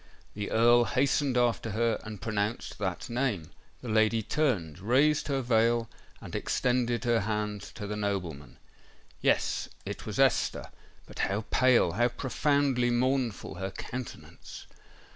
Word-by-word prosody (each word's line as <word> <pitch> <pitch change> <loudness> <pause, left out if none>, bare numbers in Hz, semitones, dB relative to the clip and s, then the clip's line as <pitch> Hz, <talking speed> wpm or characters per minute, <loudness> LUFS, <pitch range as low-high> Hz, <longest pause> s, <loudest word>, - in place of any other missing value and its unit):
The 105 0 -4
Earl 120 +1 +5
hastened 135 0 +1
after 120 -2 +1
her, 115 0 +1
and 110 -2 -8
pronounced 105 0 -2
that 95 -3 -3
name. 120 - -2 0.3
The - - -6
lady 110 +1 +3
turned—raised 125 - +1
her 135 -2 0
veil—and 115 0 -1
extended 125 -1 0
her 120 -2 +2
hand 105 -1 -2
to 105 - -6
the 105 +1 -4
nobleman. 95 -9 -4 0.6
Yes—it - - -1
was - - -4
Esther;—but - - -1
how 100 +2 -1
pale—how 120 -4 +4
profoundly 135 0 +1
mournful 125 -6 0
her 95 - -2
countenance! 125 +5 -8
115 Hz, 115 wpm, -29 LUFS, 105-125 Hz, 0.6 s, Earl